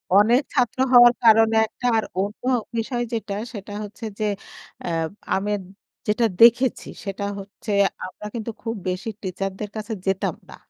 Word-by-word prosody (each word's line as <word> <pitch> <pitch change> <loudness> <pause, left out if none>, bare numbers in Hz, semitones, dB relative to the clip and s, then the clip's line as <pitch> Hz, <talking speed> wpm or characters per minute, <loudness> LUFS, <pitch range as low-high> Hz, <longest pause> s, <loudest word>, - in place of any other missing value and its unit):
অনেক 230 +6 +6
ছাত্র 250 -2 +1
হওয়ার 240 0 +9
কারণে 225 0 +6
একটা, 245 - -9
আর 220 - +1 0.2
অন্য 200 +2 -3 0.3
বিষয় 240 +2 -1
যেটা 220 -3 -3 0.2
সেটা 205 0 -8
হচ্ছে 210 +3 -8
যে 215 - 0 0.6
অ্যা 175 - -3 0.4
আমি 205 +2 -1 0.6
যেটা 220 +2 +2 0.2
দেখেছি 240 +2 +5 0.2
সেটা 195 0 -4 0.2
হচ্ছে 200 +2 -8 0.3
আমরা 200 +3 -10
কিন্তু 230 0 -3
খুব 225 0 -3
বেশি 185 +5 -3
টিচার 195 0 -3
দের 210 -1 -4
কাছে 215 +1 -4
যেতাম 190 0 0
না। - - -11
220 Hz, 150 wpm, -23 LUFS, 200-235 Hz, 0.6 s, হওয়ার